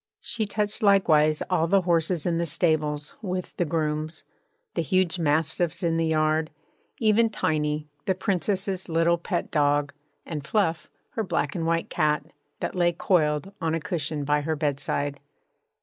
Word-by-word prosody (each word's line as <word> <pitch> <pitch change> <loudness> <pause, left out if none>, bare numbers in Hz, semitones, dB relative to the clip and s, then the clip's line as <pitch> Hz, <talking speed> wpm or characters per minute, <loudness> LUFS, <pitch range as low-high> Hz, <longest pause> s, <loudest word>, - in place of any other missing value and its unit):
She 220 -3 -3
touched 210 +2 -1
likewise 155 -7 +4
all 165 -3 +1
the 195 +2 +4
horses 170 -1 +1
in 170 -2 +1
the 170 - 0
stables, 150 -2 +1
with 185 -3 -4
the 175 - +1
grooms; 155 0 -2 0.5
the - - 0
huge 185 +3 +1
mastiffs 160 +3 0
in 165 -1 +1
the 165 0 +1
yard; 155 0 +1 0.5
even 225 0 +3
Tiny, 150 -6 -1 0.2
the 190 - +2
Princess's 190 0 -1
little 165 +1 +2
pet 175 0 -3
dog, 145 -1 +2 0.3
and 150 -4 -5
Fluff, 165 -2 0 0.2
her 225 - -2
black 145 -7 -1
and 165 -1 -2
white 165 0 0
cat, 150 -1 +1 0.4
that - - -2
lay 175 -1 +2
coiled 170 0 +1
on 165 -1 0
a - - -1
cushion 155 -2 -3
by 150 +1 +1
her 160 +2 -1
bedside. 145 -1 -1
165 Hz, 155 wpm, -26 LUFS, 150-185 Hz, 0.5 s, likewise